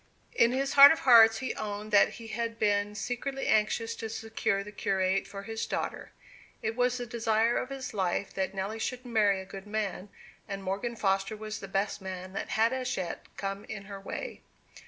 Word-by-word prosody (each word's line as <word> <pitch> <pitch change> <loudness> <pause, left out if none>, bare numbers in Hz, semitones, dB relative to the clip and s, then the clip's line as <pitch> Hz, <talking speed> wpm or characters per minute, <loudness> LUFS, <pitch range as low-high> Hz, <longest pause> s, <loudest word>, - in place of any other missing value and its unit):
In 235 - +4
his 270 +2 -1
heart 280 0 +11
of 320 - 0
hearts 225 -3 +7
he 260 +2 -3
owned 210 0 -5
that 205 -1 +5
he 230 -1 -10
had 230 0 -3
been 205 -1 +1
secretly 245 +5 -3
anxious 220 +1 +1
to 225 - -5
secure 220 -2 -1
the 210 - -10
curate 190 -1 0
for 200 0 -8
his 225 +1 -4
daughter. - - -4 0.5
It 220 +1 -1
was 250 0 +1
the 245 - -4
desire 225 0 +1
of 255 - -2
his 270 -3 -6
life 190 -1 -1
that 190 0 -2
Nelly 200 +4 -3
should 250 +2 -3
marry 210 -5 +2
a 190 - -7
good 195 +1 -10
man, 205 -2 -3 0.4
and 195 -2 -5
Morgan 200 +6 -2
Foster 195 0 0
was 215 0 -6
the 195 - -8
best 195 +1 -1
man 185 0 -7
that - - -4
had 225 +3 +2
as 255 -1 -2
yet 180 -3 -5
come 195 0 -4
in 205 -2 -7
her 200 -1 -8
way. - - -6
215 Hz, 200 wpm, -29 LUFS, 195-235 Hz, 0.5 s, heart